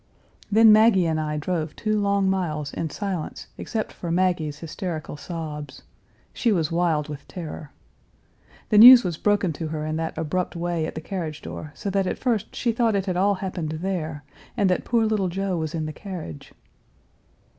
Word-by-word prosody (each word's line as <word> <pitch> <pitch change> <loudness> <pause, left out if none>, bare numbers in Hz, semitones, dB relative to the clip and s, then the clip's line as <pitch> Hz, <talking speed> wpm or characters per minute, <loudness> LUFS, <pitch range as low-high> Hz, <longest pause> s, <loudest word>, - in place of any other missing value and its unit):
Then 220 +1 +7
Maggie 215 -4 +6
and 160 -1 0
I 150 0 -2
drove 155 0 -2
two 215 -1 0
long 200 -1 +2
miles 155 -7 -1
in 160 - -3
silence 190 -1 -4
except 220 -2 -4
for 175 - -6
Maggie's 170 -4 0
hysterical 165 0 -5
sobs. 150 -2 -7 0.5
She 235 - +1
was 165 -6 +1
wild 165 -3 +1
with 150 -2 -8
terror. 160 -4 -7 1.0
The 210 - +5
news 245 +2 +11
was 175 -4 -2
broken 205 -4 +1
to 160 +2 -5
her 155 -1 -4
in 155 0 -2
that 160 0 -3
abrupt 165 +4 -2
way 170 -2 -1
at - - -7
the 160 - -4
carriage 160 -4 -5
door 150 - -7
so 200 - -4
that 195 -1 +1
at - - -2
first 235 -6 -1
she 240 - 0
thought 230 -2 +1
it 195 -1 0
had 185 -3 -1
all 200 +3 +3
happened 185 -5 -4
there, 160 -3 -3 0.3
and 200 -4 +3
that 180 - 0
poor 230 -2 +2
little 210 -4 +1
Joe 195 +1 -2
was 160 0 -3
in 160 -1 -2
the 155 - -5
carriage. 170 - -8
175 Hz, 185 wpm, -24 LUFS, 155-200 Hz, 1.0 s, news